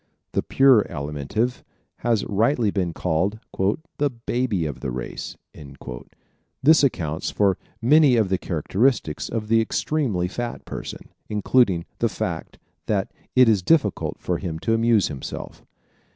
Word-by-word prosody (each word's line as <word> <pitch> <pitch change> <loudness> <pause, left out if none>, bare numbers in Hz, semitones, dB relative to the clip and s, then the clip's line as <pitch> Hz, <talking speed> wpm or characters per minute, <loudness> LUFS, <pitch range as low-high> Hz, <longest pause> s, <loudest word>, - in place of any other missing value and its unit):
The - - +1
pure 135 -6 +5
Alimentive 75 - -3 0.4
has 115 -3 0
rightly 110 +1 +2
been 90 -4 -1
called 90 +6 -1 0.6
"the 145 0 +2
baby 120 -6 -1
of 75 -4 -4
the - - -3
race." 60 0 -6 1.3
This 155 +2 +6
accounts 80 - 0
for 100 -3 +1 0.2
many 145 +1 +6
of 110 -5 +2
the 95 -1 +1
characteristics 95 - 0
of 110 -2 -3
the 115 +1 +4
extremely 110 - 0
fat 120 +5 -5
person, - - -7 0.2
including 105 -4 +2
the - - +2
fact - - -4 0.3
that 100 -2 0 0.2
it 125 -1 +7
is 105 -4 +4
difficult 110 - +1
for 90 -2 -2
him 85 -4 -4
to 115 - +1
amuse 115 -3 +3
himself. 70 -2 -7
105 Hz, 135 wpm, -23 LUFS, 90-120 Hz, 1.3 s, it